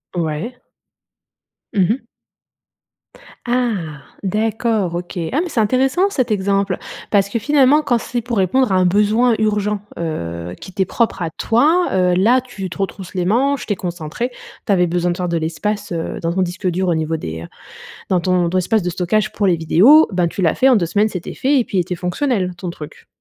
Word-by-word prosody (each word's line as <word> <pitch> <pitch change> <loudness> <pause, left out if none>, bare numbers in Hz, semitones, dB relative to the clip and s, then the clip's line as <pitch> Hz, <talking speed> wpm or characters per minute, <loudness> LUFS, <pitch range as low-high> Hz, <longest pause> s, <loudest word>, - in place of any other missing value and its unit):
Ouais. 170 +9 -3 1.2
Mmh 195 -4 +3
mh. 265 - -9 1.4
Ah, 220 - -1 0.2
d'accord, 215 -2 0
OK. 175 +1 -5
Ah, 280 - +1
mais 355 - -3
c'est 260 - -1
intéressant 265 - +2
cet 255 - -1
exemple. 200 -1 0 0.3
Parce 200 -2 +3
que 230 - -1
finalement, 285 +3 +4
quand 245 -5 +1
c'est 240 +1 -3
pour 235 0 -3
répondre 200 +6 +2
à - - +3
un 185 -1 +3
besoin 215 +5 +3
urgent, 210 -1 0 0.2
heu, 85 - -4
qui 185 - -11
t'es 190 0 +1
propre 230 -1 -1
à 165 - -1
toi, 300 - +2
heu, 180 -1 +3
là, 230 +8 +4
tu 205 -7 -7
te - - -9
retrousse 195 -1 -4
les 180 -1 0
manches, 265 +8 +1
tu 205 - 0
es - - -4
concentré, 175 +6 -4 0.3
tu - - 0
avais 180 -2 +3
besoin 175 +1 0
de 175 - -4
faire 180 -1 -2
de 170 - 0
l'espace, 200 +6 -3
heu, 165 -1 -4
dans 165 0 -1
ton 190 - 0
disque 185 +1 -2
dur 185 +1 0
au 170 - +2
niveau 160 0 -1
des 80 - -6 0.6
dans 185 -2 +2
ton 180 -1 +1
ton 185 - 0
espace 215 +4 +1
de 180 - -1
stockage 185 +4 0
pour 205 - 0
les 180 -3 +3
vidéos, 200 - +6
ben, 180 -2 +1
tu 180 - -5
l'as 165 - +3
fait 265 - +3
en 255 - +5
2 175 -5 +1
semaines, 210 +5 +2
c'était 180 -5 -6
fait 275 +2 +2
et - - 0
puis 195 - -2
il - - +4
était 180 +1 -2
fonctionnel 180 +2 -1
ton 175 0 -5
truc? 150 -3 -11
195 Hz, 205 wpm, -19 LUFS, 175-235 Hz, 1.4 s, vidéos